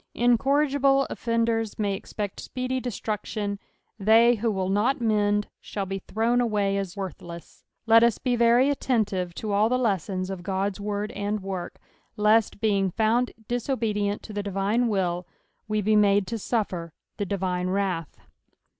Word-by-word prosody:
Incorrigible 275 +3 +3
offenders 230 -2 -1
may 205 -3 0
expect 200 +1 -5
speedy 255 0 -3
destruction: 210 -3 -3 0.4
they 225 +4 +6
who 230 0 -1
will 190 -2 -1
not 225 +9 +1
mend, 210 -2 +1
shall 200 -2 -4
be 195 +1 -4
thrown 230 +5 0
away 205 -4 +1
as 195 -2 -3
vorthlcM. 170 -4 -8 0.2
Let 225 0 +7
us 235 -1 +3
be 250 -2 0
very 240 +4 +4
attentive 205 -10 -1
tn 215 - -4
all 210 +2 +3
the 250 - +2
lessons 195 -5 -1
of 190 -2 -5
Ood's 195 +1 -1
word 205 +1 -3
and 205 +1 -3
work, 190 -2 -5 0.4
lest 210 0 +3
being 200 -3 +2
found 225 +6 +1 0.2
dis 245 +1 -3
obedient 210 -5 -1
to 215 - -9
the 205 - -2
divine 200 +4 0
will, 180 -4 -1 0.4
we 215 0 0
be 215 +2 +3
made 205 -1 +4
to 225 +4 -4
suffer 185 -8 -2 0.2
the 205 - -1
divine 185 -2 -1
wrath. 185 -5 -2
210 Hz, 155 wpm, -26 LUFS, 195-230 Hz, 0.4 s, Let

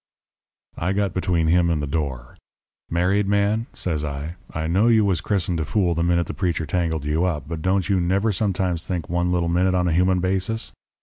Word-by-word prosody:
"I 90 +4 0
got 100 0 0
between 90 -3 0
him 85 +1 +3
and 80 -2 +1
the 75 - -2
door. 70 -5 -4 0.5
"'Married 95 +4 +1
man,' 100 +3 +1
says 80 -4 -2
I, 75 +2 -4 0.2
'I 80 0 -3
know 95 +8 +2
you 110 -3 +4
was 95 -4 +1
christened 90 -4 -1
a - - 0
fool 85 +3 +1
the 85 - -1
minute 85 0 +2
the - - -6
preacher 85 -4 -1
tangled 80 -3 -1
you 75 +3 +1
up, 85 -6 -1
but 80 -1 -5
don't 95 +1 +1
you 95 -3 +2
never 100 +5 +1
sometimes 95 -4 -1
think 90 -3 -4
one 85 +1 0
little 85 -1 0
think 90 +1 +2
on 90 0 +1
a 85 - +1
human 90 +2 +3
basis? 95 - -1
90 Hz, 205 wpm, -23 LUFS, 80-95 Hz, 0.5 s, you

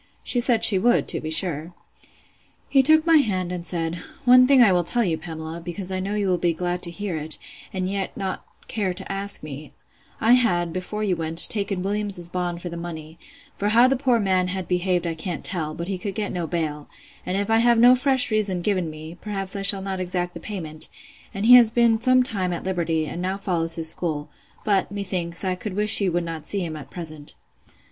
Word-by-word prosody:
She 245 - +1
said 235 -2 +2
she 200 -4 +6
would, 240 +5 +2
to - - +1
be 155 - -5
sure. 160 0 +1 0.9
He 275 - +4
took 315 +3 +5
my 330 -1 +5
hand, 185 - 0
and 180 -1 -5
said, 165 0 -2 0.3
One 255 0 +7
thing 265 -2 +6
I 210 - +5
will 180 -1 +2
tell 240 +8 +1
you, 170 -6 0
Pamela, 160 +1 -8
because 180 +3 -5
I 185 - -2
know 195 +2 -3
you 205 -2 -1
will 180 -2 +1
be 170 -1 0
glad 175 +1 -3
to 175 - +1
hear 180 0 -5
it, 155 0 -2 0.3
and 185 -1 -3
yet 195 0 -4
not 190 -1 -4 0.2
care 195 -5 -2
to 190 +1 -7
ask 195 -2 -2
me: 150 0 -9 0.5
I 225 - +2
had, 175 -9 +1
before 185 +4 -4
you 195 -4 0
went, 165 0 +4
taken 200 -3 -3
Williams's 200 -3 -1
bond 175 -1 -4
for 175 - -5
the 170 - -7
money; 165 -1 -8 0.4
for 205 - -1
how 235 +4 +5
the 270 - +1
poor 255 -3 +1
man 185 -3 +1
had 185 -1 -4
behaved 180 -1 0
I 165 - -2
can't 165 +1 -6
tell, 155 -5 -3
but 170 - -5
he 190 -2 -4
could 195 +1 -5
get 210 -2 -3
no 175 -2 -4
bail; 150 -3 -4 0.3
and 185 +1 -3
if 200 +2 -2
I 225 - +4
have 235 0 +3
no 245 +2 +7
fresh 260 -2 +1
reason 205 -4 0
given 185 -3 -1
me, 155 +2 -10
perhaps 195 -2 -4
I 200 - -3
shall 195 -1 +5
not 190 -1 -4
exact 180 -1 -3
the - - -8
payment; 160 -7 -1 0.4
and 200 +2 -4
he 245 - +8
has 235 -3 +6
been 230 -1 +2
some 255 +1 +4
time 190 -7 -2
at 170 - -5
liberty, 170 -4 -1
and 170 +3 -6
now 190 +2 -2
follows 165 -4 +2
his 160 -1 +4
school; 155 -4 -4 0.3
but, 200 -2 +1
methinks, 185 -3 -2
I 185 - 0
could 185 +1 -6
wish 210 +1 +4
you 190 -3 +1
would 175 0 -1
not 165 -2 -7
see 195 -3 0
him 160 -2 -6
at 140 -3 -10
present. 155 -4 -7
185 Hz, 225 wpm, -23 LUFS, 170-210 Hz, 0.9 s, he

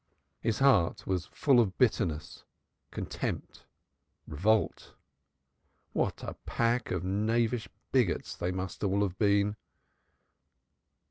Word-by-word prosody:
His 115 -2 0
heart 130 -12 +3
was 90 -2 -1
full 135 -4 +3
of 100 -6 +1
bitterness, 85 - 0 0.5
contempt, - - -5 0.6
revolt. 100 +8 0 1.0
What - - -1
a - - -4
pack 115 +1 +1
of 90 -1 -2
knavish 110 +4 0 0.2
bigots - - +1
they 90 - -2
must 95 +1 -5
all 100 0 +2
have 95 -2 -3
been! 100 0 +3
100 Hz, 105 wpm, -30 LUFS, 95-115 Hz, 1.0 s, heart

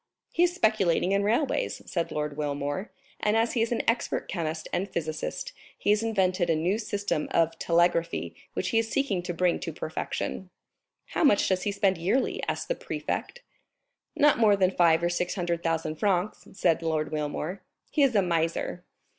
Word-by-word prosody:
"He 340 - +1
is 355 0 +3
speculating 195 - +2
in 200 0 +3
railways," 245 - 0
said 170 -2 -2
Lord 150 -1 -2
Wilmore, 145 +5 -3 0.3
"and 210 +1 +2
as 230 +1 +2
he 235 - +1
is 230 - 0
an 235 - 0
expert 230 +2 0
chemist 160 -3 -3
and 195 +3 -1
physicist, 160 - -4 0.2
he 205 - +1
has 210 +1 +3
invented 190 -5 +1
a 165 - +4
new 180 +7 0
system 205 -7 -2
of 165 0 +1
telegraphy, 170 - +1 0.2
which 185 - -2
he 225 - +3
is 225 0 -1
seeking 270 -10 0
to 175 0 -4
bring 175 0 +1
to 165 - -4
perfection." 160 +4 -4 0.6
"How - - 0
much 210 -10 +5
does 185 -1 +1
he 205 - -1
spend 195 -3 +1
yearly?" 205 +10 0
asked - - -2
the - - +1
prefect. 485 0 -4 0.7
"Not 295 -6 +4
more 215 -3 +6
than 190 -2 +3
five 170 -2 +4
or 175 - +2
six 175 0 -1
hundred 175 -3 -1
thousand 160 -2 -1
francs," 195 +1 0
said 175 -4 +2
Lord 160 -2 -1
Wilmore; 155 +4 -3 0.3
"he 300 - +1
is 270 -4 +4
a 200 - +5
miser." 170 0 -1
180 Hz, 180 wpm, -27 LUFS, 165-215 Hz, 0.7 s, more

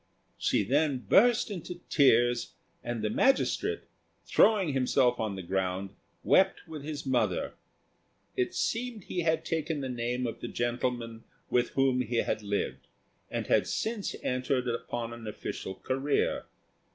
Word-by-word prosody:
She - - +2
then 140 +5 +2
burst 230 0 +5
into 180 -2 -6
tears, 120 -4 +3 0.3
and 120 -2 -3
the 105 - +1
magistrate, 270 - +2 0.4
throwing 195 -9 +4
himself 130 -1 +2
on 110 -3 -1
the 95 - -6
ground, 95 +1 -2 0.3
wept 190 -1 +3
with 155 -2 -7
his 150 -1 -5
mother. 120 -8 0 0.8
It 125 - -1
seemed 230 -3 -2
he 180 - -4
had 160 -1 +1
taken 160 -2 -1
the 135 - -3
name 125 +1 -2
of 115 - -4
the - - -5
gentleman 120 -1 -2 0.3
with 120 -1 +2
whom 135 -1 +3
he 120 0 -3
had 110 - 0
lived, 100 -1 -3 0.4
and - - -3
had - - +3
since 220 -3 -2
entered 125 0 0
upon 120 0 -3
an 115 -2 -9
official 95 -2 -5
career. 135 +6 0
125 Hz, 140 wpm, -29 LUFS, 115-155 Hz, 0.8 s, burst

